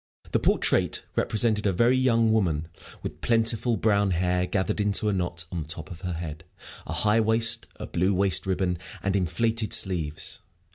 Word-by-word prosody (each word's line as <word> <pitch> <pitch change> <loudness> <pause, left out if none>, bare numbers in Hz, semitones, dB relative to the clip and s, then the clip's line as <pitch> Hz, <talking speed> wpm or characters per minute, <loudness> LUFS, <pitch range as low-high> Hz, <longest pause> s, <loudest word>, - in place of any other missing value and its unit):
The - - +2
portrait - - +1
represented 110 -1 +1
a - - +3
very 115 +8 +3
young 115 -3 +3
woman, 85 -8 +1 0.4
with - - -6
plentiful 115 0 +2
brown 100 -1 +2
hair 90 0 0
gathered 95 +2 -1
into 105 +1 +1
a - - 0
knot 90 -2 -2
on 85 -3 -3
the 75 - -9
top 80 0 -6
of 85 - -9
her 90 -2 -3
head, 80 -1 -6 0.4
a - - -5
high 105 +1 +2
waist, 110 +1 +2
a - - -7
blue 90 +3 0
waist 95 -2 +2
ribbon, 90 -2 0 0.2
and 95 0 0
inflated 110 +4 0
sleeves. 80 -6 0
95 Hz, 175 wpm, -26 LUFS, 90-110 Hz, 0.4 s, a